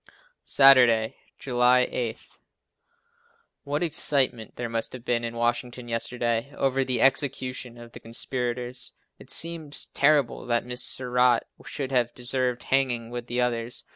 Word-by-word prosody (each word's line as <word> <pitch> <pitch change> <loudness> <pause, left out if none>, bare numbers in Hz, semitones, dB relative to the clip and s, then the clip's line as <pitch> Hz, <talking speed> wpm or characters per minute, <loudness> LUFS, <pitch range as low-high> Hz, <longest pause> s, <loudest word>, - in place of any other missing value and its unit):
Saturday, 125 -5 +5 0.2
July 125 -1 +3
8. 115 -2 -4 1.4
What 145 +3 -2
excitement 140 -8 0
there 120 - -4
must 115 -1 -4
have 125 -1 -10
been 120 -1 0
in 115 0 -5
Washington 120 +1 -2
yesterday 120 +1 -1
over 135 0 0
the 130 -1 -1
execution 130 -2 0
of 120 0 -12
the - - -11
conspirators. 125 +1 -1 0.3
It - - -15
seems 160 -3 +2
terrible 140 -4 +1
that 120 -1 0
Mrs. 125 0 -5 0.2
Surratt 125 -1 +2 0.2
should 135 -2 -5
have 120 -2 0
deserved 125 0 -2
hanging 125 -4 0
with 120 0 -6
the 120 +1 -1
others. 120 -1 -2
125 Hz, 135 wpm, -25 LUFS, 120-130 Hz, 1.4 s, Saturday